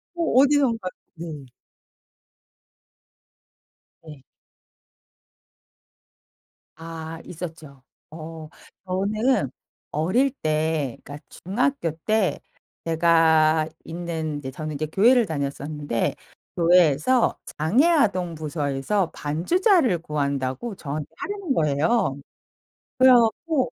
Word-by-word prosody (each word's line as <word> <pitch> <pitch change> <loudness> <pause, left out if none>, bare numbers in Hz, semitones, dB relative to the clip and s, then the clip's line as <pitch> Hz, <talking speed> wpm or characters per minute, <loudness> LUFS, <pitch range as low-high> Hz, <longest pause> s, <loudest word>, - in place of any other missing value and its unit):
어 345 - -3 0.2
어디선가 265 -9 +2 0.3
네. 160 -4 -8 2.6
네. 150 -4 -12 2.5
아 165 0 -8
있었죠. 160 -5 -9 0.3
어 160 0 -9 0.4
저는 205 - 0 0.4
어릴 185 - +1
때 155 -4 -1
그러니까 145 +1 -10
중학교 245 +1 -1 0.2
때 215 -3 +1 0.4
제가 160 -1 +3 0.2
있는 160 -3 -4
이제 135 -2 -6
저는 155 +3 -6
이제 155 +2 -2
교회를 230 - +4
다녔었는데 145 -4 -3 0.4
교회에서 175 - +3 0.2
장애 210 - +3
아동 195 - +2
부서에서 155 +4 -1
반주자를 245 - +2
구한다고 140 - -3
저한테 150 -3 -5
하라는 370 -5 -3
거예요. 150 - +1 0.8
그래 260 0 +7
갖고 250 +5 +2
165 Hz, 190 characters per minute, -24 LUFS, 150-225 Hz, 2.6 s, 그래